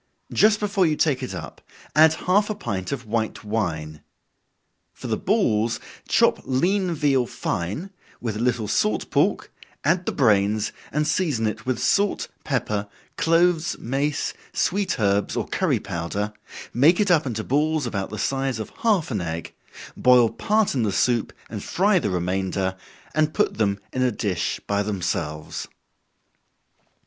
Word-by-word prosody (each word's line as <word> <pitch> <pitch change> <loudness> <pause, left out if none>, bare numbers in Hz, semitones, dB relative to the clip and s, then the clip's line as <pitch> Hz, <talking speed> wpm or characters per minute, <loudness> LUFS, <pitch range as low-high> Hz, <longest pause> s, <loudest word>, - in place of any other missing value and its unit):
Just 215 0 +4
before 200 -3 +2
you 155 - +1
take 145 -4 +1
it 130 - -4
up, - - -8 0.3
add 155 +1 +7
half 205 +4 +3
a 215 - -1
pint 100 - -4
of 130 -3 -4
white 110 0 -2
wine. 80 -8 -3 0.9
For - - -11
the - - 0
balls, 110 +2 +1 0.3
chop - - +3
lean 180 +8 +1
veal 135 -5 +2
fine, 105 - -3 0.3
with 115 -3 -3
a - - -4
little 120 -2 0
salt 105 +1 0
pork, - - +1 0.3
add 175 +5 +1
the - - +2
brains, 105 -3 +2 0.2
and 150 +1 0
season 150 -13 +1
it 110 +1 -3
with 130 -2 +1
salt, 200 - +1
pepper, 105 -7 -1 0.3
cloves, 165 0 +2
mace, 140 +4 -1 0.2
sweet 195 -5 0
herbs 100 -1 +1
or - - -1
curry - - +1
powder, 100 +5 -3 0.4
make 150 +8 +5
it 200 -3 +3
up 155 -5 +3
into 110 -3 -3
balls 150 +3 +1
about 100 -5 -3
the 105 - -6
size 135 +2 -1
of 110 - -6
half 205 - +2
an 105 -5 -1
egg, 85 -1 -5 0.4
boil 125 -2 +5
part 215 0 +1
in 130 - 0
the 105 -3 +1
soup, 120 +2 +1 0.2
and 105 -3 -6
fry 195 +1 +2
the 105 - -1
remainder, 95 +1 -1 0.4
and 155 0 +1
put - - +1
them 100 -2 +1
in 130 - -1
a 125 -1 +3
dish 100 -5 -2
by 100 0 0
themselves. 85 -6 -3
120 Hz, 155 wpm, -24 LUFS, 105-155 Hz, 0.9 s, add